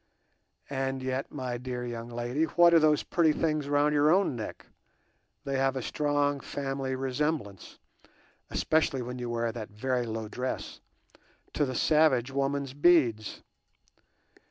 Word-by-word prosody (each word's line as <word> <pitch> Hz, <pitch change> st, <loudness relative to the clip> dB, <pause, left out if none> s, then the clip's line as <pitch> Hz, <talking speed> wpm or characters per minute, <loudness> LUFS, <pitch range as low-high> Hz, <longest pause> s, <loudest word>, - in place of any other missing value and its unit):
And 135 Hz, -1 st, -2 dB
yet, 130 Hz, +1 st, -3 dB
my 125 Hz, -4 st, -4 dB
dear 125 Hz, -1 st, -4 dB
young 120 Hz, -1 st, -6 dB
lady, 120 Hz, +6 st, -1 dB
what 170 Hz, +2 st, +5 dB
are 165 Hz, -, +8 dB
those 150 Hz, -2 st, +3 dB
pretty 160 Hz, -3 st, +2 dB
things 155 Hz, -2 st, -1 dB
round 145 Hz, +1 st, +3 dB
your 145 Hz, +1 st, +4 dB
own 185 Hz, -5 st, +3 dB
neck?—they 130 Hz, +4 st, -10 dB
have 135 Hz, 0 st, +1 dB
a 130 Hz, -, -3 dB
strong 145 Hz, 0 st, 0 dB
family 135 Hz, -1 st, -3 dB
resemblance, 130 Hz, -, -3 dB, 0.7 s
especially 155 Hz, -5 st, +1 dB
when 125 Hz, +1 st, -6 dB
you 120 Hz, -1 st, -4 dB
wear 115 Hz, -1 st, -1 dB
that 110 Hz, -2 st, -7 dB
very 125 Hz, +3 st, -2 dB
low 110 Hz, -1 st, -4 dB
dress, 125 Hz, +4 st, -5 dB, 0.7 s
to 145 Hz, -, +1 dB
the 130 Hz, -1 st, -4 dB
savage 140 Hz, -4 st, +3 dB
woman's 140 Hz, 0 st, -1 dB
beads. 140 Hz, -, +2 dB
135 Hz, 135 wpm, -29 LUFS, 120-150 Hz, 0.7 s, are